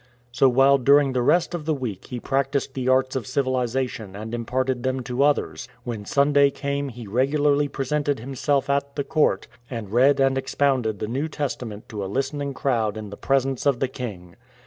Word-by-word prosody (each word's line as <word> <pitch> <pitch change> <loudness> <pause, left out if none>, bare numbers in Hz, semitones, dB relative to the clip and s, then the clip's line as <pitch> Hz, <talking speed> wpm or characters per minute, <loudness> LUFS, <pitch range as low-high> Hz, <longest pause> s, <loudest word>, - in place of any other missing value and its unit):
So 125 +3 +4
while 135 +2 +5
during 140 +1 +4
the 125 - +1
rest 165 +7 +2
of 165 -4 -4
the 155 -1 +1
week 115 -9 -5
he 125 - -5
practised 135 +1 -1
the 130 -1 -1
arts 130 0 +2
of 130 - -3
civilization 130 -5 -1
and 110 +3 -7
imparted 125 +2 -1
them 130 +1 -1
to 125 +2 -2
others, 140 -3 +1 0.2
when 115 -4 -5
Sunday 140 +3 +4
came 140 0 -3
he 120 -2 -9
regularly 140 +6 +2
presented 145 +1 -1
himself 135 +3 -1
at 140 0 -1
the 140 - -1
court, 155 +2 +1 0.2
and 115 -5 -6
read 135 +4 +4
and 135 0 +3
expounded 130 -6 0
the 105 - -4
New 135 +7 -2
Testament 125 -7 -5
to 105 -4 -4
a - - -3
listening 140 +4 -2
crowd 115 -7 0
in 105 -2 -7
the - - -6
presence 135 +2 0
of 135 -4 +2
the 135 - +1
king. 100 -9 -7
130 Hz, 190 wpm, -24 LUFS, 120-140 Hz, 0.2 s, while